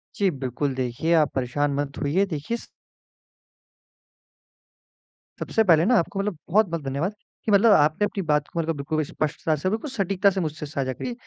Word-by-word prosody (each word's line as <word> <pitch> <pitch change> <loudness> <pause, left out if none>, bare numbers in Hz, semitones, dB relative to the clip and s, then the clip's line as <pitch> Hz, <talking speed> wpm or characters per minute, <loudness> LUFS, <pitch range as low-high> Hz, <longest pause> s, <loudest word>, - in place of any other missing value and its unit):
जी, 200 -2 +2
बिल्कुल 135 0 -3
देखिए 130 +6 -1
आप 155 -3 +3
परेशान 140 +3 0
मत 140 -1 -3
होइए 165 +8 +2
देखिए 170 +6 -3
स - - -13 2.7
सबसे 225 - +1
पहले 170 -4 +5
ना 245 +2 +4
आपको 195 +4 -3
मतलब 200 -4 -2
बहुत-बहुत 170 -6 +2
धन्यवाद 140 +9 -2 0.3
कि 220 - +1
मतलब 210 +2 +6
आपने 155 +5 +3
अपनी 200 - -3
बात 150 -2 +1
को 170 - -5
मतलब 165 0 -1
बिल्कुल 155 +2 -1
स्पष्टता 155 +1 -2
से 170 +6 -1
बिल्कुल 220 +8 -3
सटीकता 200 -4 +2
से 190 0 -2
मुझसे 155 -2 -4
साझा 140 -3 -3
करी। 245 - -5
160 Hz, 170 wpm, -24 LUFS, 145-195 Hz, 2.7 s, मतलब